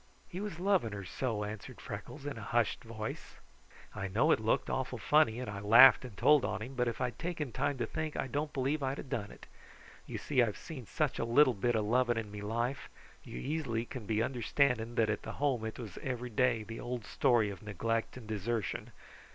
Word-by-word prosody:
"He 180 Hz, -, -6 dB
was 205 Hz, -5 st, -4 dB
loving 185 Hz, -, +2 dB
her 100 Hz, -1 st, -6 dB
so," 110 Hz, +1 st, -2 dB
answered 105 Hz, 0 st, -7 dB
Freckles 145 Hz, -1 st, -8 dB
in 145 Hz, -, -3 dB
a 115 Hz, -, -8 dB
hushed 115 Hz, +1 st, 0 dB
voice. 110 Hz, -1 st, -6 dB, 0.6 s
"I 95 Hz, -, -3 dB
know 100 Hz, +4 st, +3 dB
it -, -, +4 dB
looked 110 Hz, +1 st, +1 dB
awful 130 Hz, -1 st, -2 dB
funny, 120 Hz, 0 st, +3 dB
and 125 Hz, -, -4 dB
I 100 Hz, -1 st, -5 dB
laughed 115 Hz, +4 st, +8 dB
and 120 Hz, -6 st, -9 dB
told 150 Hz, +3 st, +5 dB
on 110 Hz, -, -2 dB
him, 130 Hz, +4 st, -7 dB
but 125 Hz, -2 st, 0 dB
if 115 Hz, -, -2 dB
I'd 125 Hz, -1 st, -2 dB
taken 165 Hz, -6 st, -3 dB
time 145 Hz, +4 st, -1 dB
to 120 Hz, -, -1 dB
think 155 Hz, +5 st, -4 dB
I -, -, 0 dB
don't 145 Hz, +3 st, -2 dB
believe 140 Hz, +3 st, 0 dB
I'd 135 Hz, +1 st, -1 dB
have 130 Hz, -, -8 dB
done 105 Hz, -2 st, -2 dB
it. -, -, -13 dB, 0.6 s
You -, -, -4 dB
see, 130 Hz, -4 st, +1 dB
I've 110 Hz, -4 st, +1 dB
seen 130 Hz, -9 st, -8 dB
such 150 Hz, -4 st, -1 dB
a -, -, +1 dB
little 130 Hz, +3 st, +5 dB
bit 120 Hz, +3 st, 0 dB
of 110 Hz, -1 st, +1 dB
loving 120 Hz, +1 st, +2 dB
in 110 Hz, -2 st, -4 dB
me 105 Hz, 0 st, -7 dB
life. 120 Hz, +6 st, -2 dB, 0.3 s
You -, -, -8 dB
easily 120 Hz, -, -2 dB
can 120 Hz, -4 st, -8 dB
be 110 Hz, 0 st, +1 dB
understanding 120 Hz, -1 st, +1 dB
that 110 Hz, -3 st, +3 dB
at 105 Hz, -, -2 dB
the -, -, -6 dB
Home 135 Hz, -5 st, 0 dB
it 110 Hz, -, -5 dB
was 110 Hz, -7 st, -7 dB
every 125 Hz, -2 st, -4 dB
day 120 Hz, -1 st, +2 dB
the 115 Hz, +2 st, -7 dB
old 120 Hz, -3 st, -4 dB
story 115 Hz, -5 st, +2 dB
of 95 Hz, -, -9 dB
neglect 115 Hz, +4 st, -2 dB
and 125 Hz, -, -10 dB
desertion. 110 Hz, 0 st, -3 dB
120 Hz, 220 wpm, -33 LUFS, 110-135 Hz, 0.6 s, laughed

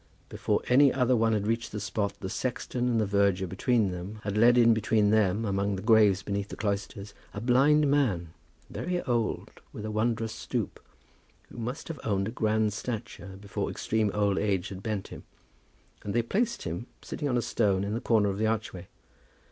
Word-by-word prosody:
Before -, -, -1 dB
any 135 Hz, +2 st, +6 dB
other 125 Hz, -1 st, +2 dB
one 115 Hz, -1 st, +2 dB
had 105 Hz, -2 st, 0 dB
reached 115 Hz, +2 st, -1 dB
the 105 Hz, -, -4 dB
spot, 100 Hz, 0 st, -2 dB
the 95 Hz, -, -3 dB
sexton 125 Hz, +3 st, -2 dB
and 115 Hz, -2 st, +2 dB
the 110 Hz, -, +2 dB
verger 100 Hz, -2 st, +2 dB
between 100 Hz, +3 st, +1 dB
them 90 Hz, +4 st, -7 dB
had 100 Hz, -1 st, -3 dB
led 120 Hz, +3 st, +5 dB
in 115 Hz, -1 st, +6 dB
between 110 Hz, -1 st, +2 dB
them, 110 Hz, 0 st, +2 dB
among 100 Hz, 0 st, 0 dB
the 95 Hz, -, -6 dB
graves 105 Hz, -4 st, +4 dB
beneath 100 Hz, 0 st, -3 dB
the -, -, -8 dB
cloisters, 100 Hz, -1 st, -3 dB, 0.2 s
a -, -, -3 dB
blind 135 Hz, +6 st, +4 dB
man, 105 Hz, -, +1 dB, 0.3 s
very 180 Hz, 0 st, -3 dB
old, 120 Hz, -3 st, -1 dB, 0.2 s
with 105 Hz, -, -7 dB
a 110 Hz, -, -3 dB
wondrous 110 Hz, +1 st, -1 dB
stoop, -, -, -4 dB, 0.7 s
but -, -, -12 dB
who 120 Hz, -, -5 dB
must 125 Hz, +6 st, -5 dB
have 160 Hz, -4 st, -6 dB
owned 100 Hz, -2 st, 0 dB
a -, -, -4 dB
grand 110 Hz, -2 st, +1 dB
stature 105 Hz, -4 st, -6 dB
before 100 Hz, -1 st, -4 dB
extreme 110 Hz, -1 st, 0 dB
old 100 Hz, -2 st, +1 dB
age 95 Hz, -3 st, 0 dB
had 95 Hz, -1 st, -8 dB
bent 105 Hz, -2 st, -3 dB
him, -, -, -9 dB, 0.8 s
and 100 Hz, -, -4 dB
they 120 Hz, -, +3 dB
placed 235 Hz, -, -1 dB
him 85 Hz, +8 st, -5 dB, 0.2 s
sitting 145 Hz, -, -3 dB
on 125 Hz, -, +1 dB
a -, -, +1 dB
stone 100 Hz, -4 st, +1 dB
in 100 Hz, +1 st, -2 dB
the 115 Hz, -, -2 dB
corner 105 Hz, -3 st, +3 dB
of 100 Hz, +1 st, -3 dB
the 110 Hz, -, +2 dB
archway. 105 Hz, -5 st, -3 dB
110 Hz, 195 wpm, -28 LUFS, 100-120 Hz, 0.8 s, any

